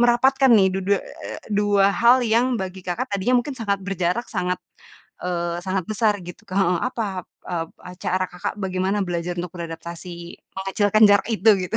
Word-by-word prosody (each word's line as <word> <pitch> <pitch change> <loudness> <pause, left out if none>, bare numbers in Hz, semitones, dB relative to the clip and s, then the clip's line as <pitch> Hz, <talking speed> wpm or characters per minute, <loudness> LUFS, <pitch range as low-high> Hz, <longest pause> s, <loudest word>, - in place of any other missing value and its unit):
merapatkan 260 +3 +4
nih 195 -4 +6
du 190 - -1
du 200 - +2
eee, - - -8
dua 205 -1 +4
hal 240 +4 +5
yang 230 +2 +3
bagi 190 0 -5
Kakak 235 +9 -2
tadinya 200 +6 +1
mungkin 285 - -5
sangat 200 -3 -1
berjarak 190 +3 -1
sangat, 180 0 0 0.7
eee, 175 -1 -1
sangat 190 -1 0
besar 215 -1 +2
gitu, 175 +6 -10
Kak, 185 - -5
heeh. 180 -2 +2
Apa, 235 -3 -3 0.4
e 180 - -3 0.5
cara 185 +1 +1
Kakak 180 - -4
bagaimana 190 +1 0
belajar 175 0 -2
untuk 175 -1 -6
beradaptasi, 170 +1 -7 0.5
mengecilkan 205 +3 +3
jarak 200 +2 +4
itu, 220 +1 +5 0.2
gitu? 225 - -1
195 Hz, 170 wpm, -23 LUFS, 180-225 Hz, 0.7 s, nih